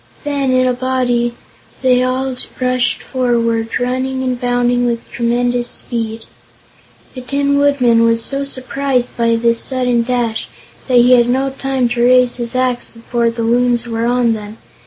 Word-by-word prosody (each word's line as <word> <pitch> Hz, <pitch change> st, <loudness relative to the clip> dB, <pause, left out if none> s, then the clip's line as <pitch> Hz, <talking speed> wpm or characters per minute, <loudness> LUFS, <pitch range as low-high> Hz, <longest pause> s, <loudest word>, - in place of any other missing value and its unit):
Then, 280 Hz, -3 st, -1 dB
in 255 Hz, 0 st, +3 dB
a 255 Hz, -, +2 dB
body, 245 Hz, -2 st, 0 dB, 0.5 s
they 250 Hz, -1 st, +4 dB
all 255 Hz, +1 st, -1 dB, 0.2 s
rushed 255 Hz, -1 st, 0 dB
forward, 230 Hz, -3 st, 0 dB
running 260 Hz, +1 st, -2 dB
and 255 Hz, -1 st, -2 dB
bounding 245 Hz, 0 st, +1 dB
with 235 Hz, -1 st, -3 dB
tremendous 240 Hz, +1 st, 0 dB
speed. 225 Hz, -2 st, -5 dB, 0.9 s
The 255 Hz, -, -7 dB
Tin 280 Hz, +2 st, 0 dB
Woodman 255 Hz, -5 st, +3 dB
was 230 Hz, 0 st, +2 dB
so 275 Hz, 0 st, -2 dB
surprised 260 Hz, -1 st, -2 dB
by 230 Hz, -1 st, +2 dB
this 230 Hz, 0 st, +1 dB
sudden 250 Hz, -2 st, +1 dB
dash 235 Hz, -2 st, -2 dB, 0.4 s
that 255 Hz, -2 st, +3 dB
he 245 Hz, +1 st, +5 dB
had 240 Hz, -1 st, +5 dB
no 265 Hz, +2 st, 0 dB
time 270 Hz, -2 st, -1 dB
to 235 Hz, 0 st, -1 dB
raise 250 Hz, 0 st, +4 dB
his 240 Hz, 0 st, -4 dB
axe 255 Hz, -1 st, 0 dB
before 235 Hz, 0 st, -1 dB
the 230 Hz, 0 st, -4 dB
Loons 240 Hz, +1 st, +1 dB
were 230 Hz, 0 st, -1 dB
on 240 Hz, -1 st, +2 dB
them. 215 Hz, 0 st, -7 dB
245 Hz, 155 wpm, -16 LUFS, 235-255 Hz, 0.9 s, he